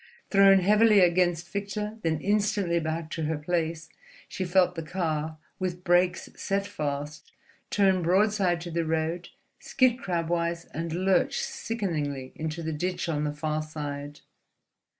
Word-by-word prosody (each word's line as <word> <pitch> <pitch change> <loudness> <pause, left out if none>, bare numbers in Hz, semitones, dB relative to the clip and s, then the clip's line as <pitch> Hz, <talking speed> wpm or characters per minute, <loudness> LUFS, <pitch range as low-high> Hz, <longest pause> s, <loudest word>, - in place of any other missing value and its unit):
Thrown 195 -1 +6
heavily 210 +2 +5
against 175 -1 +2
Victor, 210 +2 -4
then 160 -4 0
instantly 200 -3 +1
back 160 0 -3
to 160 - -2
her 160 0 -1
place, 165 +1 -2 0.4
she 185 - -4
felt 180 0 +3
the 165 - -5
car, 155 -2 -2 0.2
with 180 -1 -3
brakes 180 0 +2
set 195 0 -1
fast, 150 -5 -5 0.4
turn 190 -2 +3
broadside 185 0 +2
to 175 0 -6
the 170 0 0
road, 160 +2 -2 0.3
skid 255 -2 +2
crabwise, 170 -3 -1
and 165 +1 -3
lurch 185 +2 +1
sickeningly 150 - -3
into 160 +1 -4
the 160 0 -2
ditch 180 +4 -2
on 150 -2 -1
the 150 - -1
farther 155 +1 -3
side. 145 -1 -6
170 Hz, 140 wpm, -27 LUFS, 160-190 Hz, 0.4 s, Thrown